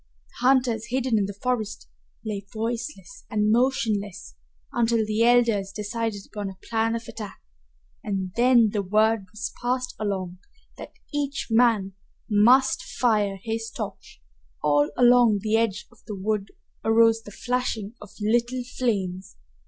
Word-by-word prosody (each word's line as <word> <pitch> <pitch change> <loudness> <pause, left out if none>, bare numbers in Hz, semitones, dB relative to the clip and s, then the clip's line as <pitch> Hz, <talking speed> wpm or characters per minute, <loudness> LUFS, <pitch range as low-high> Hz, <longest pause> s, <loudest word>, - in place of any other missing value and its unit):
The 250 - -2
hunters, 245 -4 +2
hidden 250 -2 +1
in 200 - 0
the 200 0 -9
forest, 240 -4 -2 0.4
lay 205 -2 -3
voiceless 240 - -5
and 215 -2 +1
motionless 215 - 0 0.4
until 230 -1 +2
the 215 +1 -1
elders 230 -5 +3
decided 210 0 -3
upon 205 -2 -5
a 190 - -11
plan 225 0 +1
of 230 0 -6
attack, 210 -3 -8 0.6
and 190 -3 -3
then 240 -3 +5
the 205 - 0
word 215 +1 +2
was 210 +2 -5
passed 250 +1 -1
along 190 -4 -3 0.4
that - - -9 0.2
each 285 -2 -2
man 225 -4 +3 0.3
must 240 +5 +4
fire 210 -5 0
his 225 0 -3
torch. 215 - -8 0.4
All 145 0 +3
along 245 -3 +6
the 215 0 +1
edge 225 -3 0
of 240 - -22
the 210 - -5
wood 200 +1 -1 0.4
arose 225 0 +4
the 220 - -11
flashing 235 -2 -2
of - - -10
little 240 +4 +1 0.2
flames. 190 -6 -1
225 Hz, 140 wpm, -25 LUFS, 205-240 Hz, 0.6 s, along